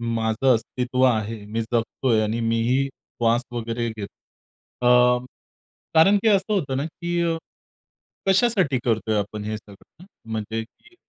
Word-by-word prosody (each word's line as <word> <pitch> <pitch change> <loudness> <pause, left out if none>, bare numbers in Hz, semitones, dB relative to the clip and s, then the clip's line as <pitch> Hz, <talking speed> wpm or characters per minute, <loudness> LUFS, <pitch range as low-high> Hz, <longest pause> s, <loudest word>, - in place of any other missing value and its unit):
माझं 115 +3 +2
अस्तित्व 125 +3 -1
आहे. 110 -3 0
मी 110 +2 -3
जगतोय 115 0 0
आणि 110 +2 -1
मीही 115 +4 +1
श्वास 120 -2 -1
वगैरे 115 0 -2
घेतो. 105 -2 -6 0.8
अ, 125 0 +5 0.7
कारण 195 +6 +6
की - - +3
असं 200 0 +3
होतं 140 -9 0
ना 140 - -1
की 170 +2 -3
अ, 165 -1 +1 0.9
कशासाठी 195 - +3
करतोय 110 -2 +1
आपण 105 +1 -4
हे 110 0 -3
सगळं 100 -2 -16 0.2
ना? - - -13 0.3
म्हणजे, 110 +1 -3
की 350 - -23
120 Hz, 140 wpm, -23 LUFS, 110-135 Hz, 0.9 s, कारण